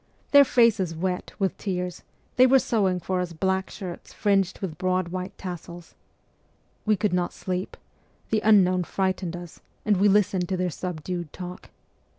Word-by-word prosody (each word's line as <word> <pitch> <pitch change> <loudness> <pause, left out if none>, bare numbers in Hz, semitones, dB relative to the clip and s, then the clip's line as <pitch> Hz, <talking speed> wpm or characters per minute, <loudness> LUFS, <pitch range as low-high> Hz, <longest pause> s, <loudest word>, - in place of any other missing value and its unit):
Their 285 -1 +8
faces 220 -10 +3
wet 180 +2 -2
with 195 -2 0
tears, 180 -3 -3 0.3
they 255 +1 +7
were 270 +1 +6
sewing 195 -8 +1
for 185 +2 -2
us 175 -1 -4
black 190 +3 0
shirts 185 -4 -8
fringed 195 -3 +1
with 165 -6 -5
broad 185 -1 0
white 185 +2 -5
tassels. 175 -2 -8 0.9
We 215 - +5
could 200 0 0
not 180 -1 0
sleep: 185 0 -4 0.5
the 215 -1 +2
unknown 185 -4 +5
frightened 185 -1 -2
us, 175 -2 -9 0.3
and 210 -2 +3
we 200 +3 +4
listened 195 -3 +2
to 190 - 0
their 180 -1 -1
subdued 175 -1 -5
talk. 180 -1 -8
185 Hz, 160 wpm, -25 LUFS, 180-200 Hz, 0.9 s, Their